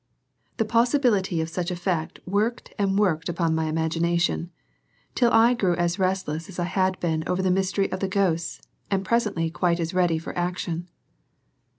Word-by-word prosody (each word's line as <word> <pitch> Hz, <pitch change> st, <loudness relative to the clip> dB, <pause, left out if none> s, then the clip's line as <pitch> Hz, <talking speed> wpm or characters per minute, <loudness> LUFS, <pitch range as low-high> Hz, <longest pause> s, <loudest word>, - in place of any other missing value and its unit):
the 225 Hz, -, +1 dB
possibility 230 Hz, -, +2 dB
of 160 Hz, -, -2 dB
such 175 Hz, +2 st, -3 dB
a 180 Hz, -, -2 dB
fact 175 Hz, -2 st, -2 dB
worked 210 Hz, +6 st, -1 dB
and 195 Hz, -1 st, +1 dB
worked 175 Hz, -5 st, +1 dB
upon 170 Hz, -1 st, 0 dB
my 160 Hz, 0 st, 0 dB
imagination 165 Hz, +2 st, 0 dB, 0.6 s
till 240 Hz, -2 st, +3 dB
I 230 Hz, +2 st, +6 dB
grew 190 Hz, -7 st, +1 dB
as 175 Hz, +2 st, 0 dB
restless 185 Hz, -3 st, -1 dB
as 190 Hz, -, -10 dB
I 175 Hz, -, 0 dB
had 185 Hz, +1 st, 0 dB
been 160 Hz, -2 st, -1 dB
over 185 Hz, +1 st, 0 dB
the 185 Hz, -, +2 dB
mystery 195 Hz, +1 st, +1 dB
of 185 Hz, -, -3 dB
the 195 Hz, -, -1 dB
ghosts 185 Hz, -4 st, 0 dB, 0.3 s
and 195 Hz, -1 st, 0 dB
presently 200 Hz, -8 st, 0 dB
quite 175 Hz, 0 st, +1 dB
as 165 Hz, +1 st, -2 dB
ready 175 Hz, -3 st, +2 dB
for 160 Hz, -, -7 dB
action. 175 Hz, -1 st, -3 dB
180 Hz, 175 wpm, -25 LUFS, 165-195 Hz, 0.6 s, I